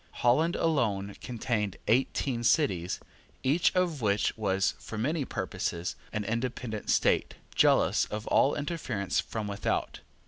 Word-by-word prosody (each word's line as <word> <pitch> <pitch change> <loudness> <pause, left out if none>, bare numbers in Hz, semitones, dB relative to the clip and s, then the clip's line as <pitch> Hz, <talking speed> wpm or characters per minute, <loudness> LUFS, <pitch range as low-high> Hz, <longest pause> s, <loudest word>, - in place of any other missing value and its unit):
Holland 155 +8 +4
alone 105 -11 0
contained 110 -5 -2
eighteen 120 +1 +1
cities, 95 - +2 0.4
each 150 +6 +3
of 175 -6 +1
which 105 -1 +1
was, 95 -3 +1
for 110 - -7
many 140 +6 0
purposes, 85 -8 -3 0.2
an 105 -1 -2
independent 115 0 -3
state, - - +2 0.2
jealous - - +4
of 105 +1 -5
all 140 - +3
interference 145 - -2
from 110 -2 -3
without. 100 -1 -2
115 Hz, 125 wpm, -29 LUFS, 100-140 Hz, 0.4 s, Holland